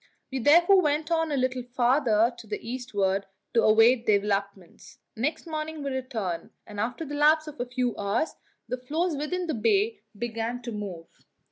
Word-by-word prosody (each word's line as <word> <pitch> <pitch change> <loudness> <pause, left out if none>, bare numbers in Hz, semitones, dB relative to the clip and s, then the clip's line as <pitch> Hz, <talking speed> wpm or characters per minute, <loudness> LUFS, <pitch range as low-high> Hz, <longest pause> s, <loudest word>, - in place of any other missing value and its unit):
We 265 - -2
therefore 345 - +6
went 305 0 0
on 325 -1 +1
a 285 - 0
little 255 0 0
farther 245 -2 +2
to 235 -2 -12
the 210 - -3
eastward 205 -6 -1 0.3
to 230 - +4
await 225 +3 +5
developments. 200 -3 -1 0.2
Next 300 +10 -2
morning 310 -1 -4
we 275 - -2
returned, 230 -10 -3 0.2
and 205 -1 -8
after 245 +9 -2
the 290 - -7
lapse 305 +2 +4
of 305 -1 -10
a 245 - -2
few 245 -1 -1
hours 205 +10 -1 0.3
the 250 - -3
floes 310 +7 -1
within 330 +6 -2
the 320 - -2
bay 405 - +1 0.2
began 235 +2 -3
to 235 - -5
move. 195 -6 -6
250 Hz, 170 wpm, -27 LUFS, 220-300 Hz, 0.3 s, therefore